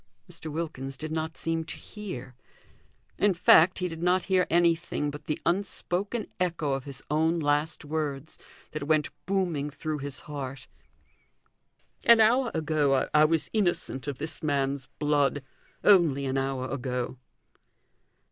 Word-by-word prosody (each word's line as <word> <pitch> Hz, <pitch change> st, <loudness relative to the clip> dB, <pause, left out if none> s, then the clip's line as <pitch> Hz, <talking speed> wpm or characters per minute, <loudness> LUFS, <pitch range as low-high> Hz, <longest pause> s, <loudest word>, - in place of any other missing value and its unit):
Mr. 160 Hz, -, -8 dB
Wilkins 145 Hz, -4 st, -4 dB
did 155 Hz, +3 st, -6 dB
not 160 Hz, 0 st, -3 dB
seem 165 Hz, 0 st, -1 dB
to 160 Hz, -, -7 dB
hear; 135 Hz, -, -8 dB, 0.9 s
in 200 Hz, -2 st, +3 dB
fact, 175 Hz, 0 st, +6 dB
he 180 Hz, -, -1 dB
did 165 Hz, -1 st, -7 dB
not 180 Hz, +1 st, +2 dB
hear 185 Hz, -2 st, +2 dB
anything 170 Hz, -3 st, +1 dB
but 145 Hz, 0 st, -9 dB
the 150 Hz, -, -2 dB
unspoken 200 Hz, +3 st, -1 dB
echo 165 Hz, -6 st, 0 dB
of 135 Hz, -1 st, -3 dB
his 140 Hz, -1 st, -3 dB
own 160 Hz, +2 st, +2 dB
last 150 Hz, +1 st, 0 dB
words, 150 Hz, -1 st, -3 dB, 0.3 s
that 155 Hz, -2 st, -5 dB
went 155 Hz, -1 st, +2 dB, 0.2 s
booming 175 Hz, -7 st, 0 dB
through 155 Hz, +1 st, -4 dB
his 140 Hz, -1 st, -5 dB
heart: 135 Hz, -3 st, -7 dB, 1.4 s
"An 235 Hz, -1 st, +7 dB
hour 240 Hz, +3 st, +4 dB
ago 150 Hz, -4 st, +2 dB
I 150 Hz, 0 st, +6 dB
was 160 Hz, -1 st, 0 dB
innocent 175 Hz, -10 st, 0 dB
of 140 Hz, -3 st, -3 dB
this 155 Hz, +1 st, -5 dB
man's 140 Hz, -2 st, -1 dB
blood! 145 Hz, -1 st, +1 dB, 0.4 s
Only 165 Hz, -9 st, +5 dB
an 135 Hz, 0 st, -1 dB
hour 135 Hz, -1 st, -2 dB
ago!" 125 Hz, -1 st, -3 dB
155 Hz, 140 wpm, -28 LUFS, 140-170 Hz, 1.4 s, An